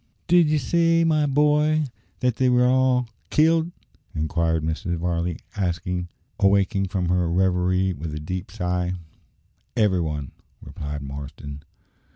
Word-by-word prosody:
"Did 175 -3 +5
ye 155 - +3
say, 165 +4 +2
my 155 -2 +2
boy, 150 +2 +3 0.4
that 125 -2 +1
they 130 -1 +3
were 125 0 +4
all 125 -1 +3 0.2
killed?" 165 +2 +3 0.4
inquired 80 +1 0
Mrs. 85 +3 -2
Varley, 85 0 -1 1.0
awaking 100 0 +2
from 90 -2 -2
her 90 -1 +1
reverie 90 +1 +1
with 80 0 -6
a - - -4
deep 90 +5 -5
sigh. 90 0 -2 0.8
"Every 100 -5 +3
one," 75 -4 -3 0.3
replied 75 0 -6
Marston. 70 +1 -8
95 Hz, 125 wpm, -24 LUFS, 85-130 Hz, 1.0 s, Did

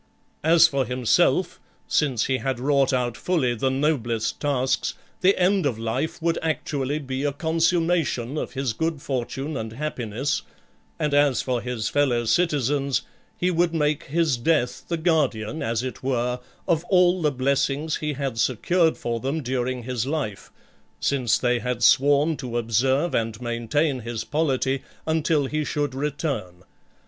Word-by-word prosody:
As 165 +1 +6
for 140 -3 0
himself, 125 -2 +2 0.3
since 130 -6 +1
he 130 - +1
had 135 -2 -2
wrought 140 +1 +2
out 125 -3 0
fully 150 -9 0
the 125 +3 0
noblest 125 -5 0
tasks, 135 -3 0 0.2
the 190 +2 +4
end 185 -2 +3
of 120 -5 -2
life 130 +9 -2
would 170 0 +1
actually 150 -3 -1
be 135 -2 -4
a 145 - +1
consummation 165 -4 0
of - - -4
his 135 -3 -1
good 160 +4 -2
for 130 -3 -2
tune 140 +5 -5
and 110 -3 -4
happiness; 130 -1 -2 0.6
and 150 -1 -1
as 145 -2 +3
for 125 -2 -1
his 120 -3 -3
fellow 125 -4 +1
citizens, 140 0 +1 0.3
he 180 +1 +1
would 170 -1 +1
make 150 -2 0
his 155 -2 +1
death 125 -1 0
the 170 - -1
guardian, 155 -6 0
as 115 +1 -1
it 130 - -5
were, 125 -1 -1 0.3
of 165 -1 +2
all 180 -1 +4
the 150 -2 +2
blessings 140 +3 0
he 150 -1 -2
had 135 -4 -3
secured 160 - +2
for 115 -1 -2
them 140 +5 -2
during 125 0 -2
his 125 0 -2
life, 135 -10 -3 0.5
since 130 -5 +1
they 125 -1 +1
had 125 -1 -2
sworn 145 +5 +4
to 125 -4 -4
observe 130 +8 +1
and 115 -1 -1
maintain 125 +4 0
his 115 -1 -4
polity 135 -3 0 0.2
until 160 -2 +1
he 155 +3 -1
should 145 -2 -2
return. 135 - -3
135 Hz, 155 wpm, -24 LUFS, 125-155 Hz, 0.6 s, As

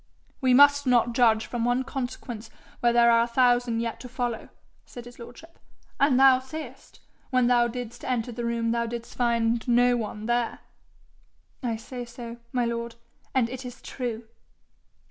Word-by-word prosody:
'We 255 -1 +4
must 285 0 +6
not 240 -1 +3
judge 230 -2 +3
from 240 -2 -3
one 245 +2 +1
consequence 245 -4 -6 0.3
where 240 - +3
there 235 0 +5
are 230 0 +5
a 235 - +1
thousand 245 -1 +2
yet 230 -1 -4
to 250 - -9
follow,' 240 -2 -3 0.3
said 240 -1 -11
his 245 0 -13
lordship. 320 +8 -13 0.2
' - - -36
And 275 -2 +4
thou 265 -1 +7
sayest, 305 +4 -10 0.3
when 255 -2 +2
thou 240 -1 +4
didst 240 0 -7
enter 245 -1 -2
the 240 +1 -5
room 235 -1 -1
thou 235 0 0
didst 235 0 -7
find 235 -1 0
no 245 0 +4
one 215 -2 -4
there?' 240 0 -1 1.0
'I 240 -4 -1
say 245 +3 -7
so, 235 0 -9
my 245 -1 0
lord, 235 0 -4 0.4
and 250 -3 +3
it 255 +2 -7
is 245 -1 -9
true.' 240 -3 -5
240 Hz, 170 wpm, -26 LUFS, 235-250 Hz, 1.0 s, thou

